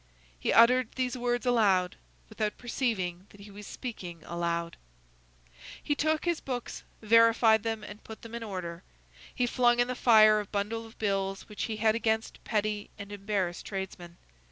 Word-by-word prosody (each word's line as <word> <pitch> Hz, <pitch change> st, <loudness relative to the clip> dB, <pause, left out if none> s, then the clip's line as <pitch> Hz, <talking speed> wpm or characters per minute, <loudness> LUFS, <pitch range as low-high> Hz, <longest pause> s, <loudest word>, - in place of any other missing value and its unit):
He -, -, 0 dB
uttered 245 Hz, +1 st, +5 dB
these 255 Hz, -1 st, -1 dB
words 245 Hz, 0 st, -1 dB
aloud, 200 Hz, -7 st, +3 dB, 0.3 s
without 210 Hz, -1 st, -3 dB
perceiving 200 Hz, -7 st, -2 dB
that 205 Hz, -, -16 dB
he 205 Hz, 0 st, -12 dB
was 205 Hz, +1 st, -10 dB
speaking 180 Hz, -9 st, -7 dB
aloud. 170 Hz, 0 st, -2 dB, 1.1 s
He 290 Hz, -, +1 dB
took 310 Hz, +2 st, 0 dB
his 345 Hz, -2 st, +1 dB
books, 250 Hz, -3 st, -5 dB, 0.2 s
verified 225 Hz, 0 st, +5 dB
them, 225 Hz, -1 st, -3 dB
and 210 Hz, 0 st, -10 dB
put 220 Hz, -, -11 dB
them 230 Hz, 0 st, -10 dB
in 235 Hz, -, -5 dB
order. 180 Hz, -5 st, -5 dB, 0.5 s
He 250 Hz, -, +1 dB
flung 240 Hz, 0 st, +3 dB
in 245 Hz, -, +3 dB
the 255 Hz, -, -2 dB
fire 215 Hz, -3 st, +6 dB
a 210 Hz, -, -4 dB
bundle 220 Hz, +3 st, -3 dB
of 225 Hz, -, -18 dB
bills 195 Hz, -2 st, -2 dB
which 210 Hz, -, -4 dB
he 220 Hz, -2 st, -4 dB
had 220 Hz, 0 st, +3 dB
against 220 Hz, 0 st, -1 dB
petty 210 Hz, -1 st, -1 dB
and 200 Hz, -1 st, -9 dB
embarrassed 195 Hz, -4 st, -2 dB
tradesmen. 190 Hz, -3 st, -6 dB
215 Hz, 165 wpm, -29 LUFS, 195-235 Hz, 1.1 s, fire